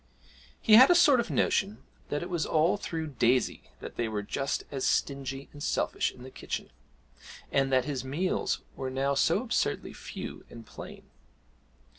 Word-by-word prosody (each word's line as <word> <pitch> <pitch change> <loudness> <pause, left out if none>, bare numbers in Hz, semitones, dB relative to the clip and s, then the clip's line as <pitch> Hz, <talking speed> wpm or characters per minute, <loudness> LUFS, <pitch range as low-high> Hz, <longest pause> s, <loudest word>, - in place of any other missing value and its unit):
He 215 - +3
had 260 +3 +9
a 355 - +6
sort 300 -7 +6
of 235 - -1
notion 205 +1 0 0.3
that 145 +3 -2
it 175 - -6
was 170 -3 0
all 160 +4 +2
through 165 -5 -4
Daisy 130 -4 0
that - - -8
they 120 - 0
were 105 -2 -3
just 135 +6 -2
as 135 -2 -3
stingy 135 -1 -1
and 145 - -11
selfish - - 0
in 125 - -14
the 130 - -10
kitchen, - - -5 0.8
and 135 0 +2
that 130 -1 +3
his 140 -4 -3
meals 155 +8 -1
were 130 -1 -4
now 135 +2 0
so 140 - +2
absurdly - - -1
few - - -8
and 115 -1 -11
plain. - - -10
140 Hz, 170 wpm, -29 LUFS, 130-175 Hz, 0.8 s, had